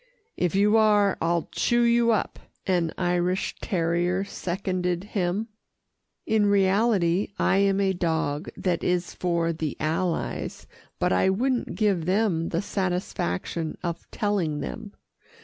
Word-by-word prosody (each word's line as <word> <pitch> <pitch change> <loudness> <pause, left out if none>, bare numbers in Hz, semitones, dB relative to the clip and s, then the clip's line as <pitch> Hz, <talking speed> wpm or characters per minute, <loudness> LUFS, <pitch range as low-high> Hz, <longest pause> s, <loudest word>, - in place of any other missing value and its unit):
"If 180 0 0
you 210 +3 +4
are, 210 -2 +4
I'll 170 0 0
chew 240 0 +2
you 235 0 +3
up," 220 -4 0 0.3
an 175 -4 +1
Irish 180 +1 0
terrier 175 +1 0
seconded 180 -2 -2
him. 200 +1 -2 0.8
In 215 -2 +2
reality, 195 -2 +3
I - - +2
am 195 0 +3
a 195 -1 +2
dog 160 -3 -1
that 180 -3 -1
is 180 0 0
for 170 -2 0
the 155 -2 -4
Allies, 165 +3 -2 0.3
but - - +1
I 90 - +3
wouldn't 245 +6 0
give 200 -7 +1
them 185 -4 +1
the 170 +3 -1
satisfaction 175 - -2
of 170 -1 -4
telling 185 -8 -1
them. - - -6
185 Hz, 130 wpm, -25 LUFS, 170-205 Hz, 0.8 s, you